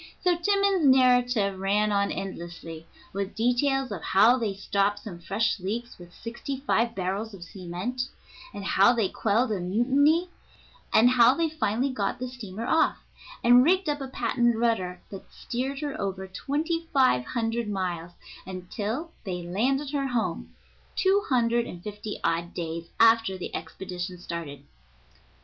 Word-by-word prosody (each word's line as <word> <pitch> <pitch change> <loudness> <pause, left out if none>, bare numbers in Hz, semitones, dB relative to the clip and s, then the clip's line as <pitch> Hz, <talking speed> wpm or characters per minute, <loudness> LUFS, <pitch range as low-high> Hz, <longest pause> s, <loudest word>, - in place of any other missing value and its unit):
So 360 -1 +4
Timmans's 395 -2 +2
narrative 245 -6 +4
ran 205 +2 +1
on 200 0 +1
endlessly, 170 -3 -7 0.3
with 195 0 -3
details 255 +3 +1
of 190 -5 -4
how 215 +6 +5
they 210 -4 -2
stopped 200 +1 0
some 180 -5 -8
fresh 200 +5 0
leaks 225 +6 -4
with 175 0 -12
sixty 235 +7 -6
five 235 -4 +1
barrels 195 +3 -3
of 180 - -10
cement, 190 +8 -5 0.4
and 200 - -7
how 200 +5 +5
they 225 -6 +1
quelled 225 +3 +1
a 205 - -1
mutiny 275 - +2 0.6
and 225 +3 +6
how 245 0 +6
they 330 0 +1
finally 265 -3 0
got 210 -6 -2
the 255 - -4
steamer 230 -4 -7
off, 320 +6 +2 0.5
and 245 +1 +7
rigged 370 +4 +3
up 290 -1 -1
a 270 - -4
patent 240 -2 +1
rudder 190 -6 0
that 195 -2 -10
steered 265 +4 -4
her 290 -6 -4
over 190 -1 -3
twenty 310 - -2
five 255 - +4
hundred 225 - -2
miles, 175 -4 -3 0.3
until 210 - -4
they 180 -4 -4
landed 260 +11 0
her 280 -2 -1
home, 240 -3 -2 0.4
two 390 +1 +3
hundred 235 -2 +2
and 175 0 -9
fifty 210 0 -6
odd 170 +1 -1
days 165 0 -4
after 225 -4 +5
the 185 - -6
expedition 180 +2 -6
started. 165 -5 -6
225 Hz, 150 wpm, -27 LUFS, 190-255 Hz, 0.6 s, and